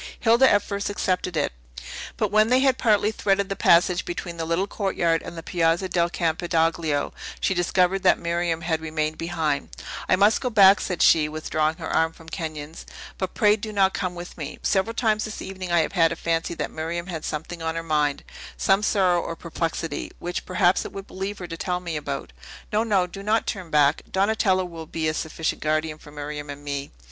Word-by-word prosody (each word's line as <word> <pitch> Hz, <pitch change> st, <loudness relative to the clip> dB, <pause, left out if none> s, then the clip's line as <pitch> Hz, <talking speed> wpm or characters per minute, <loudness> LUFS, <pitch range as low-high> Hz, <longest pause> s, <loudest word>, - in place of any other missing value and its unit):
Hilda 235 Hz, +3 st, +5 dB
at 205 Hz, -, +4 dB
first 200 Hz, 0 st, -3 dB
accepted 180 Hz, -3 st, -1 dB
it; 145 Hz, -, +1 dB, 0.7 s
but -, -, 0 dB
when 215 Hz, +1 st, +5 dB
they 255 Hz, +1 st, +4 dB
had 265 Hz, -2 st, +3 dB
partly 210 Hz, -2 st, +3 dB
threaded 200 Hz, -2 st, 0 dB
the 195 Hz, -, -2 dB
passage 175 Hz, 0 st, +4 dB
between 175 Hz, 0 st, -5 dB
the 165 Hz, -, -2 dB
little 170 Hz, +4 st, +1 dB
courtyard 180 Hz, -5 st, 0 dB
and 170 Hz, -, -8 dB
the 165 Hz, -, -6 dB
Piazza 170 Hz, +1 st, +1 dB
del 175 Hz, -1 st, +1 dB
Campidoglio, 165 Hz, -2 st, 0 dB, 0.3 s
she -, -, +1 dB
discovered 180 Hz, +1 st, +2 dB
that -, -, +5 dB
Miriam 170 Hz, -1 st, -1 dB
had 160 Hz, -1 st, -1 dB
remained 155 Hz, -1 st, -2 dB
behind. 165 Hz, -4 st, -1 dB, 0.4 s
"I -, -, +6 dB
must 205 Hz, +3 st, +4 dB
go 255 Hz, -, 0 dB
back," 200 Hz, -3 st, +7 dB
said 180 Hz, -3 st, 0 dB
she, 155 Hz, -2 st, +5 dB
withdrawing 155 Hz, 0 st, -1 dB
her -, -, -6 dB
arm 160 Hz, 0 st, +1 dB
from 165 Hz, 0 st, -14 dB
Kenyon's; 155 Hz, -2 st, -6 dB, 0.3 s
"but 190 Hz, -1 st, -3 dB
pray 210 Hz, -1 st, +5 dB
do 215 Hz, 0 st, -6 dB
not 195 Hz, -2 st, +3 dB
come 180 Hz, -1 st, -2 dB
with 175 Hz, 0 st, -9 dB
me. 150 Hz, -1 st, -5 dB
Several 210 Hz, +4 st, +1 dB
times 220 Hz, -3 st, +1 dB
this 215 Hz, -, -6 dB
evening 185 Hz, -2 st, -6 dB
I 170 Hz, -1 st, +4 dB
have 155 Hz, -, -2 dB
had 165 Hz, -4 st, +4 dB
a -, -, -2 dB
fancy 165 Hz, +1 st, -1 dB
that -, -, -3 dB
Miriam 165 Hz, +2 st, -4 dB
had 165 Hz, -4 st, -5 dB
something 160 Hz, +3 st, -5 dB
on 160 Hz, 0 st, -2 dB
her 165 Hz, -, -3 dB
mind, 150 Hz, -3 st, 0 dB, 0.3 s
some 195 Hz, +1 st, +3 dB
sorrow 185 Hz, -5 st, +2 dB
or 165 Hz, -, -5 dB
perplexity, 165 Hz, -2 st, -3 dB
which, 175 Hz, +1 st, -5 dB
perhaps, 185 Hz, 0 st, +3 dB
it -, -, -7 dB
would 195 Hz, 0 st, -8 dB
relieve 195 Hz, +2 st, -4 dB
her 175 Hz, -, -7 dB
to 165 Hz, -, -6 dB
tell 180 Hz, +1 st, -1 dB
me 170 Hz, -3 st, -5 dB
about. 145 Hz, -2 st, -4 dB, 0.4 s
No, 215 Hz, +1 st, +3 dB
no; 200 Hz, -5 st, +2 dB
do 190 Hz, +2 st, -9 dB
not 215 Hz, +3 st, +1 dB
turn 185 Hz, -4 st, -4 dB
back! 145 Hz, -2 st, +3 dB
Donatello 190 Hz, -1 st, +2 dB
will 165 Hz, -2 st, -8 dB
be 160 Hz, 0 st, -2 dB
a 155 Hz, -, +1 dB
sufficient 160 Hz, +1 st, -3 dB
guardian 155 Hz, 0 st, -1 dB
for 150 Hz, -, -14 dB
Miriam 145 Hz, 0 st, -6 dB
and 145 Hz, 0 st, -8 dB
me." 140 Hz, -1 st, -4 dB
175 Hz, 205 wpm, -24 LUFS, 160-195 Hz, 0.7 s, back